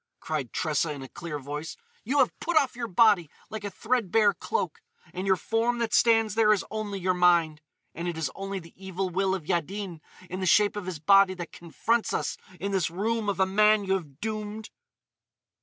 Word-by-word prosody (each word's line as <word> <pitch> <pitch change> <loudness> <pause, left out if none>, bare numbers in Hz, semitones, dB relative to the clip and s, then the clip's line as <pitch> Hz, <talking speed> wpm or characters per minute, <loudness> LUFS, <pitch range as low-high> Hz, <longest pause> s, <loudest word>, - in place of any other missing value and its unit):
cried 150 -7 -3
Tressa 155 0 0
in 140 -2 -6
a - - -8
clear 165 +1 -6
voice, 145 +3 -6 0.3
"you 265 +6 -1
have 260 -4 +4
put 340 0 0
off 275 -5 +3
your 240 -1 -3
body 200 -5 +4 0.2
like 215 -1 -5
a 205 - -3
threadbare 215 -2 +2
cloak, 460 - -3 0.3
and 185 +2 -4
your 190 - +5
form 225 +5 0
that 230 -2 -2
stands 225 -2 +4
there 220 -1 +4
is 210 - +2
only 215 -2 -3
your 185 0 +1
mind! 170 -4 +3 0.3
And 170 +2 -5
it 170 -2 -3
is 160 -3 -2
only 195 0 -5
the 165 -3 -10
evil 190 0 -4
will 190 +1 +1
of 175 -5 -7
Yaddin 175 0 -3 0.3
in 185 +2 -5
the 185 - -1
shape 205 +3 +4
of 205 -3 -5
his 185 -3 -4
body 195 +4 +5
that 175 -2 -7
confronts 220 +7 -1
us - - -2 0.2
in 200 +1 -3
this 190 -4 +1
room 210 +4 -1
of 195 -2 -2
a 190 - +5
man 210 +2 +4
you 190 - +1
have 155 -7 -4
doomed!" 215 0 -5
195 Hz, 205 wpm, -27 LUFS, 170-215 Hz, 0.3 s, your